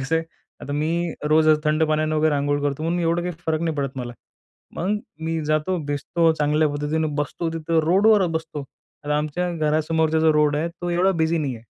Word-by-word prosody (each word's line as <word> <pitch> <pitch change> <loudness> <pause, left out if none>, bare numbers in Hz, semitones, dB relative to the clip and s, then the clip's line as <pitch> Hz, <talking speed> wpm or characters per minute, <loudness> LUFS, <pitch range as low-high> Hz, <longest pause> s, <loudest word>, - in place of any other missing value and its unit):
कसं 145 +5 0
आहे, 165 - -1 0.4
आता 145 - -6
मी 165 +3 -1 0.2
रोज 155 0 +4 0.2
थंड 155 +1 +2
पाण्यानं 155 0 0
वगैरे 155 -1 +2
अंघोळ 145 0 0
करतो 145 +1 -2
म्हणून 170 +2 0
मी - - -1
एवढं 170 +1 +1
काही 180 0 -3
फरक 160 0 0
नाही 160 -2 -1
पडत 135 -2 -3
मला. 120 -1 -5 0.6
मग 200 +5 0 0.3
मी 165 0 -1
जातो, 155 +5 0
भिजतो 160 +3 +1
चांगल्या 150 0 +2
पद्धतीने, 150 +2 -1
बसतो 165 +3 -3
तिथं, 165 0 0
रोडवरच 195 +1 +4
बसतो. 160 -3 -4 0.4
आता 150 0 0
आमच्या 165 +4 -2
घरासमोरचा 155 +1 +1
जो 160 -1 +4
रोड 150 -1 +2
आहे, 165 +3 -1
तो 175 +1 -6
एवढा 180 +3 +3
बिझी 160 +1 +1
नाही 140 -5 -2
आहे. 115 - -15
155 Hz, 200 wpm, -23 LUFS, 150-165 Hz, 0.6 s, रोज